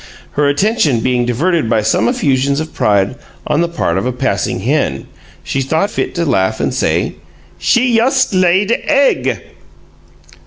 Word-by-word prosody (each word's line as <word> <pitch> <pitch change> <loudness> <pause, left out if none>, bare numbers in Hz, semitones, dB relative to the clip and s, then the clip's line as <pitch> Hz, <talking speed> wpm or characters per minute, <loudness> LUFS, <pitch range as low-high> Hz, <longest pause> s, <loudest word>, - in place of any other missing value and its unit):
Her 145 -1 +1
attention 145 - +1
being 125 -1 0
diverted 155 +2 0
by 110 -2 +1
some 110 +1 +1
effusions 140 0 0
of 155 0 -5
pride 100 +2 +1 0.3
on 150 +2 +1
the 170 - +1
part 95 - -1
of 95 - -4
a - - 0
passing 125 -8 -2
hen, 115 - -1 0.4
she 135 - -2
thought 160 +10 0
fit - - -3
to 170 -1 -1
laugh 110 -6 0
and - - -1
say: - - -1 0.4
"She 245 +1 +2
yust 255 +1 +2
laid 185 +3 +2
egg." 280 -2 +1
140 Hz, 155 wpm, -15 LUFS, 120-185 Hz, 0.4 s, She